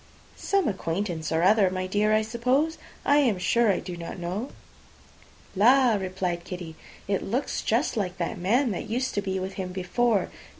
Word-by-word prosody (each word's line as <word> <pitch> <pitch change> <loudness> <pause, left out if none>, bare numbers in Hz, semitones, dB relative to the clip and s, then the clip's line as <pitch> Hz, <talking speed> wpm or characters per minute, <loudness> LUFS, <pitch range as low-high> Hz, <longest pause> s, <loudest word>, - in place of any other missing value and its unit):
"Some 395 -1 0
acquaintance 175 -4 -2
or 160 +1 +1
other, 200 0 +5
my 185 0 -3
dear, 205 +3 +1
I 215 0 +3
suppose; 250 +8 0 0.3
I 285 - +5
am 250 -9 +3
sure 220 +5 +3
I 185 - 0
do 180 -1 -6
not 170 +1 -7
know." 185 +9 -4 1.1
"La!" 245 +4 +5
replied 185 -3 -2
Kitty, 175 -3 -7 0.3
"it 195 -1 0
looks 250 +7 -2
just 235 +7 0
like 190 -4 -2
that 180 +3 -3
man 235 +8 +2
that 185 - -5
used 250 +3 -1
to 205 - 0
be 190 -1 -2
with 190 +1 -4
him 180 -1 -5
before. 195 +4 0
200 Hz, 175 wpm, -26 LUFS, 180-235 Hz, 1.1 s, other